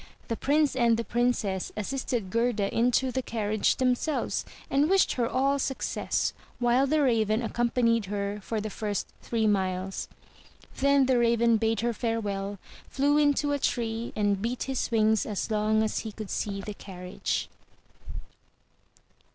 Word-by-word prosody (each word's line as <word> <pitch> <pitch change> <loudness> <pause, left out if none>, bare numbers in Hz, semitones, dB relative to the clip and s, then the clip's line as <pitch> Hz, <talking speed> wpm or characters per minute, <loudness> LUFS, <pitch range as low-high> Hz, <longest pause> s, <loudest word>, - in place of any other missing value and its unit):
The 230 - 0
Prince 290 +3 +2
and 235 -3 +3
the 230 - -1
Princess 235 -6 0
assisted 235 -2 -2
Gerda 230 -3 0
into 250 +2 +2
the 260 - -1
carriage 215 -3 0
themselves, 255 +4 0 0.2
and 285 +3 +2
wished 385 0 +4
her 240 -2 0
all 275 +2 +1
success, 265 -1 -1 0.2
while 245 +2 +3
the 300 +1 +2
Raven 225 -3 +2
accompanied 230 -1 +1
her 200 +1 -3
for 220 +3 -3
the 215 0 -4
first 210 -2 -3
three 225 -2 -1
miles. 190 -2 0 0.7
Then 280 0 +4
the 255 -1 +3
Raven 235 -1 +3
bade 225 0 0
her 235 0 0
farewell, 205 -4 -2 0.3
flew 285 +2 +2
into 290 0 +2
a 285 - 0
tree, 230 -2 -1
and 205 -2 +1
beat 235 +3 -2
his 265 -2 -2
wings 220 -2 +2
as 210 +1 -3
long 215 +1 +2
as 220 - -1
he 220 - -5
could 215 -1 -7
see 200 -1 -2
the 210 +1 -6
carriage. 180 -2 -4
230 Hz, 150 wpm, -28 LUFS, 210-255 Hz, 0.7 s, wished